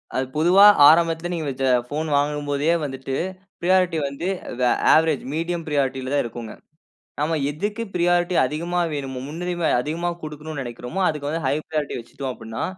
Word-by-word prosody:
அது 130 - 0
பொதுவா 180 +5 +6 0.2
ஆரம்பத்தில 165 +1 +3
நீங்க 160 -3 -3
வெச்ச 135 0 -2 0.3
போன் 155 +2 -2
வாங்கும்போதே 145 +2 0
வந்துட்டு 135 -1 -5 0.4
ஃப்ரியாரிட்டி 180 -1 +2
வந்து 140 +6 -5 0.3
வெ 125 - +3 0.2
அவரேஜ், 160 -2 +3
மீடியம் 165 +1 -2
ஃப்ரியாரிட்டில 135 -3 -1
தான் 145 - +2
இருக்கும்ங்க. 115 -1 -7 0.7
நாம 155 +2 0
எதுக்கு 205 +9 -3
ஃப்ரியாரிட்டி 175 0 +2
அதிகமா 170 +6 -2
வேணுமோ, 135 -3 -4
முன்னுரிமை 175 +2 -2
அதிகமா 165 +6 -2
குடுக்கனும்னு 155 -1 -6
நெனைக்கிறோமோ, 125 +8 -6
அதுக்கு 150 -2 -3
வந்து 165 0 -3
ஹை 135 - +2
ஃப்ரியாரிட்டி 155 -3 -3
வச்சுட்டோம் 130 +3 -6
அப்படினா, 115 -1 -7
155 Hz, 145 wpm, -23 LUFS, 135-170 Hz, 0.7 s, பொதுவா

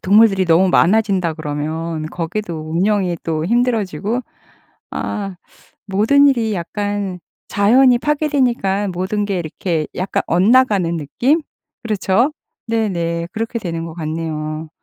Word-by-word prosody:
동물들이 195 -1 +4
너무 170 +3 +4
많아진다 190 -3 +3
그러면 155 +1 -3
거기도 165 -1 -4
운영이 185 0 +1
또 160 -1 -2
힘들어지고 225 -1 0 0.7
아 195 -3 -4 0.5
모든 220 +9 +4
일이 230 -5 +1
약간 200 +1 -3 0.3
자연이 245 +5 +4
파괴되니깐 250 -9 0
모든 190 +4 -1
게 195 -2 -1
이렇게 165 -1 -2
약간 185 +1 -1
엇나가는 195 -2 +3
느낌? 245 - +1 0.4
그렇죠? 220 +4 +1 0.3
네 225 -1 0
네. 170 -2 -2
그렇게 225 +2 -3
되는 165 -5 -4
것 165 - -7
같네요. 155 -1 -4
190 Hz, 275 characters per minute, -18 LUFS, 165-220 Hz, 0.7 s, 동물들이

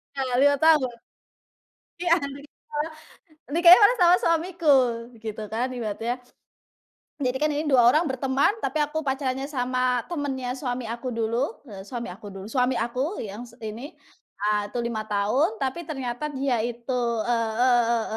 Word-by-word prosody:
Ya, 270 - -1 0.2
5 285 +1 +5
tahun. 305 -6 +4 1.1
Iya, 350 -1 +3
nikah 285 +2 -6 0.7
nikahnya 345 +1 +9
malah 480 +5 +6
sama 355 0 +7
suamiku, 335 -2 +2 0.5
gitu 220 -1 -5
kan, 235 +3 -1
ibaratnya. 230 0 -3 1.1
Jadi 255 0 0
kan 305 +1 +1
ini, 295 +2 -1
2 245 -3 +6
orang 305 +8 +5
berteman, 265 +3 +2
tapi 310 -8 -1
aku 300 +1 -2
pacarannya 265 0 -1
sama 255 -3 0
temennya 265 -5 -3
suami 250 -2 -3
aku 235 +2 -4
dulu, 230 +4 -2
eee, 190 -1 -9
suami 240 -1 -5
aku 205 +4 -11
dulu 195 0 -8
suami 250 +1 +1
aku, 255 - -2
yang 215 +3 -7
s 235 - -17
ini. 230 +9 -7 0.5
Ah 210 0 +1
itu 205 - -17
5 220 -2 -3
tahun, 215 - +1
tapi 270 +5 -3
ternyata 270 -3 -4
dia 265 -2 0
itu, 240 +1 -5 0.4
eee 230 -2 +1
eee 245 -1 +5
eee 230 - 0
255 Hz, 150 wpm, -25 LUFS, 235-295 Hz, 1.1 s, nikahnya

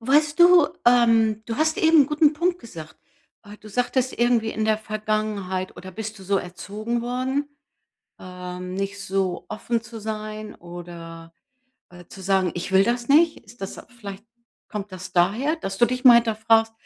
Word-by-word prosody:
Weißt 295 +6 +2
du, 345 -3 +8 0.2
ähm, 225 -3 +4
du 225 0 -4
hast 315 +1 +1
eben 320 -2 +6
'n 270 - -2
guten 300 0 +3
Punkt 345 +3 0
gesagt. 165 - -11 0.5
Äh, 205 0 -11
du 215 - -13
sagtest 245 +3 -1
irgendwie 240 -2 +2
in 220 - -2
der 215 0 +2
Vergangenheit 215 -3 -3
oder 185 0 -10
bist 220 +1 -6
du 190 - -12
so 200 +1 +1
erzogen 210 +6 -4
worden? 255 +4 -2 0.7
Ähm, 180 0 -7
nicht 195 +1 -3
so 190 -2 -2
offen 230 +1 -2
zu 230 0 -9
sein 215 0 -6
oder, 170 -1 -10 0.6
äh, 175 -1 -14
zu 190 - -12
sagen: 190 -1 +2
„Ich 180 +2 -5
will 190 - +6
das 240 +3 -1
nicht.“ 315 +3 +5
Ist 230 +1 -17
das 195 - -6 0.2
vielleicht 200 -1 -8 0.4
kommt 205 -1 -6
das 185 0 -9
daher, 215 - +2
dass 195 -10 -5
du 240 - +6
dich 250 0 -3
mal 245 - +10
hinterfragst, 225 -1 +3
215 Hz, 170 wpm, -23 LUFS, 190-245 Hz, 0.7 s, mal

